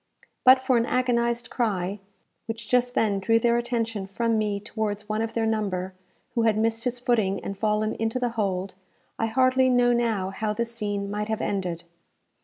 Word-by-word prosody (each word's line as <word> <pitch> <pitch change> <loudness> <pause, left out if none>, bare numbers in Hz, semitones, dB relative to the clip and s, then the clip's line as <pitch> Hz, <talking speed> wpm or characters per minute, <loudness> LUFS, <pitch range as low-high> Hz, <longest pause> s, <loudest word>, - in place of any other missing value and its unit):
But 260 +1 +8
for 260 -1 +2
an 230 +1 +1
agonized 240 -1 0
cry, 200 -4 -1 0.5
which 225 -1 -5
just 250 +1 +1
then 205 -3 +2
drew 225 +4 +3
their 235 +1 +3
attention 230 -4 -2
from 230 +3 0
me 210 -2 0
towards 210 -1 -4
one 215 0 -1
of 225 0 -3
their 225 -1 0
number, 195 -4 -1 0.4
who 235 - +1
had 220 -2 +3
missed 225 +2 0
his 245 0 -1
footing 220 -6 +1
and 195 - -4
fallen 215 +1 0
into 225 +2 -1
the 250 -1 0
hold, 195 -4 -2 0.5
I 225 - +1
hardly 255 +2 +3
know 245 -1 +4
now 220 -6 0
how 210 +2 -2
this 235 +2 -3
scene 205 -3 -3
might 210 0 -2
have 220 -1 -2
ended. 180 -4 -2
225 Hz, 185 wpm, -25 LUFS, 205-235 Hz, 0.5 s, But